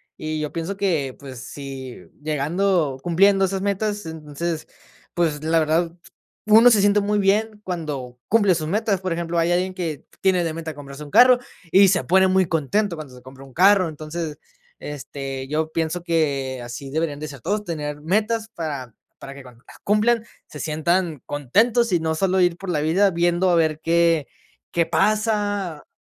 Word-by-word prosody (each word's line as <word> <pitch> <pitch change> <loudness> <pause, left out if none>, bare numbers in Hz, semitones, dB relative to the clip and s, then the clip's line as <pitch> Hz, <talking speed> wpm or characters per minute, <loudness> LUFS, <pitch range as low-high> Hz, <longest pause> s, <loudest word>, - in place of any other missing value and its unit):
Y 155 0 -4
yo 150 -1 -3
pienso 165 +4 -4
que, 160 -10 -1
pues, 130 -3 -9
si 130 -1 -8 0.2
llegando 155 0 0
cumpliendo 195 +3 +4
esas 190 0 -2
metas, 205 0 -1
entonces, 160 +1 -5 0.5
pues, 155 -4 0
la 165 +1 +2
verdad, 160 +2 +1 0.6
uno 225 +3 +7
se 215 - +5
siente 205 +1 +4
muy 205 +1 0
bien 210 +2 +1
cuando 150 -9 -5
cumple 205 -4 +4
sus 155 -2 -3
metas. 200 +1 0
Por 185 -1 -3
ejemplo, 170 0 -3
hay 165 +1 +2
alguien 185 +2 0
que 170 -5 -5 0.2
tiene 185 -2 +3
de 160 - -2
meta 160 -1 -5
comprarse 140 0 -10
un 145 - -11
carro 250 - +7 0.3
y 195 0 +7
se 180 -2 +2
pone 190 +2 +4
muy 190 0 +3
contento 170 +5 0
cuando 150 -5 -9
se 125 - -13
compra 130 +2 -13
un 135 -1 -15
carro. 190 +1 +5
Entonces, 155 0 -6 0.4
este, 135 -2 -6
yo 155 +1 -1
pienso 165 +2 -1
que 140 -6 -1
así 120 +3 -7
deberían 150 0 -2
de 155 - -5
ser 140 -4 -10
todos, 210 - -2
tener 150 -4 -4
metas 215 +7 0
para 140 -8 -5 0.3
para 135 - -9
que 140 - -11
cuando 125 -1 -16
las - - -15
cumplan 220 +3 +2 0.2
se 150 - -11
sientan 160 -1 -1
contentos 215 - +1
y 175 - +3
no 160 0 -1
solo 190 +3 +1
ir 175 -2 +3
por 190 +2 -8
la 155 -4 0
vida 180 +7 +3
viendo 175 +1 +1
a 175 - +4
ver 160 -2 +1
qué 165 -2 +2 0.4
qué 170 -1 +2
pasa. 205 -6 0
165 Hz, 180 wpm, -22 LUFS, 150-195 Hz, 0.6 s, uno